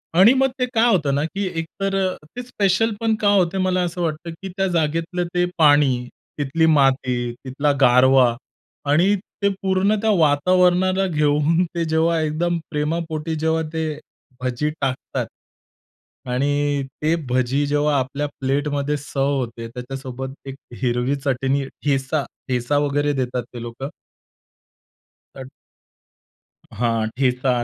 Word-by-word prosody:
आणि 200 Hz, +8 st, +7 dB
मग 270 Hz, 0 st, +3 dB
ते 250 Hz, -, +2 dB
काय 235 Hz, 0 st, +4 dB
होतं 150 Hz, -6 st, +1 dB
ना, 145 Hz, -, +1 dB
की 195 Hz, +5 st, -3 dB
एकतर 195 Hz, +4 st, -3 dB
अ, 190 Hz, -1 st, 0 dB, 0.2 s
ते 245 Hz, -, -4 dB
स्पेशलपण 220 Hz, 0 st, +1 dB
का 210 Hz, -, +2 dB
होते, 190 Hz, -1 st, +2 dB
मला 185 Hz, -1 st, +1 dB
असं 175 Hz, 0 st, -3 dB
वाटतं, 165 Hz, 0 st, -3 dB
की 190 Hz, -, -6 dB
त्या 195 Hz, 0 st, +1 dB
जागेतलं 165 Hz, +1 st, -1 dB
ते 180 Hz, 0 st, +2 dB
पाणी, 145 Hz, -6 st, +4 dB, 0.3 s
तिथली 145 Hz, +3 st, +1 dB
माती, 130 Hz, -5 st, +2 dB
तिथला 140 Hz, +3 st, 0 dB
गारवा 125 Hz, -1 st, +5 dB, 0.6 s
आणि 180 Hz, +7 st, +4 dB, 0.3 s
ते 200 Hz, -, +3 dB
पूर्ण 190 Hz, +2 st, +2 dB
त्या 220 Hz, -, +1 dB
वातावरणाला 180 Hz, +5 st, +3 dB
घेऊन, 150 Hz, +1 st, +2 dB
ते 170 Hz, -1 st, 0 dB
जेव्हा 160 Hz, +1 st, +2 dB
एकदम 165 Hz, +3 st, 0 dB
प्रेमापोटी 160 Hz, +1 st, -2 dB
जेव्हा, 160 Hz, +1 st, 0 dB
ते 155 Hz, -2 st, -2 dB, 0.4 s
भजी 130 Hz, +4 st, -1 dB
टाकतात. 130 Hz, -2 st, -2 dB, 1.0 s
आणि 145 Hz, +2 st, 0 dB, 0.2 s
ते 155 Hz, +2 st, +2 dB
भजी 130 Hz, +3 st, +1 dB
जेव्हा 145 Hz, 0 st, +2 dB
आपल्या 140 Hz, +3 st, -2 dB
प्लेटमध्ये 145 Hz, +2 st, 0 dB
सर्व्ह 140 Hz, 0 st, -1 dB
होते, 115 Hz, -2 st, -4 dB
त्याच्यासोबत 130 Hz, +1 st, -7 dB
एक 135 Hz, -, -6 dB, 0.3 s
हिरवी 125 Hz, +2 st, +1 dB
चटणी, 135 Hz, 0 st, -1 dB
ठेचा 140 Hz, +1 st, -1 dB, 0.2 s
ठेचा 125 Hz, +3 st, 0 dB
वगैरे 145 Hz, 0 st, +1 dB
देतात 125 Hz, -2 st, -2 dB
ते 120 Hz, -, -7 dB
लोकं. 120 Hz, +4 st, -6 dB, 1.5 s
तर 130 Hz, -1 st, -8 dB, 1.3 s
हां, 115 Hz, -2 st, +1 dB
ठेचा, 125 Hz, -2 st, +1 dB
150 Hz, 130 wpm, -21 LUFS, 135-175 Hz, 1.5 s, आणि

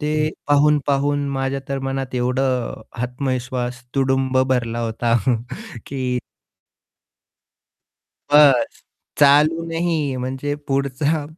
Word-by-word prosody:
ते 150 Hz, 0 st, -1 dB, 0.4 s
पाहून-पाहून 145 Hz, -1 st, +2 dB
माझ्या 135 Hz, 0 st, -2 dB
तर 140 Hz, 0 st, -2 dB
मनात 135 Hz, -1 st, -3 dB
एवढं 125 Hz, 0 st, 0 dB, 0.2 s
आत्मविश्वास 125 Hz, -1 st, -3 dB
तुडुंब 130 Hz, -1 st, +1 dB
भरला 120 Hz, -2 st, -1 dB
होता 115 Hz, 0 st, 0 dB, 0.7 s
की 130 Hz, -2 st, -2 dB, 2.1 s
बस्स! 145 Hz, -4 st, +5 dB, 0.4 s
चालू 150 Hz, +3 st, +5 dB
नाही 165 Hz, 0 st, -1 dB, 0.3 s
म्हणजे 135 Hz, +3 st, -3 dB
पुढचा 140 Hz, +3 st, 0 dB
135 Hz, 85 wpm, -21 LUFS, 125-145 Hz, 2.1 s, बस्स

